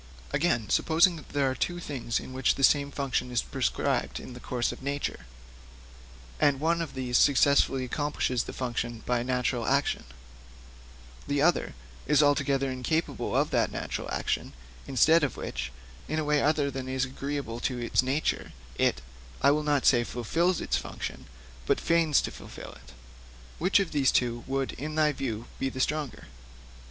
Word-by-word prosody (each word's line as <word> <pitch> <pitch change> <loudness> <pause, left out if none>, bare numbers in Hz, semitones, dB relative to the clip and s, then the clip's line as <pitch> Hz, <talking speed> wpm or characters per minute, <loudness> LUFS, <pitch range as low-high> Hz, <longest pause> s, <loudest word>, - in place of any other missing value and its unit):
'Again, 130 -9 +1
supposing 165 0 +3
there 140 -2 +1
are - - -1
two 175 +6 -2
things 130 -8 -5
to - - 0
which 130 0 +1
the 135 - -3
same 140 +1 +4
function 135 -3 -2
is 120 -1 0
prescribed - - -1
in 125 - -9
the 125 - -9
course 120 -1 -1
of - - -9
nature, 140 - -3 1.1
and 140 -2 +3
one 165 +3 +1
of 160 -5 -5
these 125 -2 +1
successfully 140 -1 +4
accomplishes 130 -2 -1
the - - -6
function 120 -2 -3
by 125 -1 +1
natural 125 -1 0
action, 140 +1 +1 1.2
the 145 0 0
other 160 - +2 0.3
is 150 0 +5
altogether 140 -2 +2
incapable 145 +6 -1
of - - +1
that - - +2
natural - - -4
action, - - -2 0.3
instead 150 +5 +4
of 140 - -1
which, 65 - -4 0.4
in 155 - -2
a 155 - 0
way 150 -1 +2
other 145 -1 +2
than 130 -1 -5
is 130 0 0
agreeable 135 -3 -4
to 125 0 -2
its 120 -1 +2
nature, 135 +4 -1 0.3
it - - +2 0.4
I 140 - +7
will 150 +1 +2
not 145 -2 +1
say 120 -3 +5
fulfils 165 - 0
its 65 - 0
function, - - -6 0.4
but - - +2
feigns 165 -3 +3
to - - -3
fulfil - - -10
it: - - -15 0.7
which 185 +4 +4
of 195 -4 -1
these 140 -3 +3
two 120 -1 0
would 135 0 -1
in 155 +3 -6
thy 155 -1 +3
view 120 -5 -4
be 135 - 0
the 130 - -7
stronger?' 150 -1 -2
135 Hz, 165 wpm, -28 LUFS, 125-150 Hz, 1.2 s, I